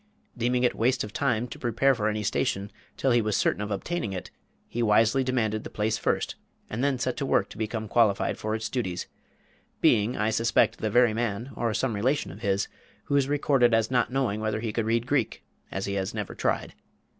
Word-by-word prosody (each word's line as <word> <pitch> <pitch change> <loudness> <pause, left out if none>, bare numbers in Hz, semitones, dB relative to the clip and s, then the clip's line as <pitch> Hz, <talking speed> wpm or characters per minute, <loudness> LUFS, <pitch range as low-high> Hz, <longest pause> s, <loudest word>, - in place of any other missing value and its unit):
Deeming 125 +1 +1
it 125 - +3
waste 125 +3 +1
of 105 0 -7
time 120 -4 0
to - - -9
prepare 120 +4 +2
for 110 -4 0
any 105 0 -2
station 100 -1 -1 0.3
till 135 - +2
he 120 -1 +4
was 105 -2 0
certain 100 - +1
of 105 - -3
obtaining 105 - -2
it, 90 - -6 0.4
he 120 - -3
wisely 115 +4 +4
demanded 110 -4 0
the - - -7
place 110 +1 0
first, - - 0 0.4
and 120 +5 -2
then 140 -2 +2
set 125 0 -1
to - - -3
work 100 -7 +1
to - - -11
become 110 0 -3
qualified 105 -2 +2
for 110 0 -2
its 110 0 -3
duties, 95 -9 -3 0.7
being, 105 +4 +3
I 105 +1 +1
suspect, 115 0 +2
the 110 - -1
very 120 +1 +4
man, 115 +2 -2
or 115 -2 0
some 125 0 0
relation 125 - 0
of 100 +5 -12
his, 100 -2 0 0.4
who 140 - -1
is 140 -2 +3
recorded 135 -5 +3
as 115 +1 +1
not 125 0 +2
knowing 125 -6 0
whether 110 0 -1
he 110 -1 -3
could 115 -1 0
read 115 +1 +1
Greek, 130 -3 0 0.3
as 95 - -3
he 100 - -3
had 95 -1 -2
never - - -4
tried. - - -1
115 Hz, 215 wpm, -27 LUFS, 105-125 Hz, 0.7 s, he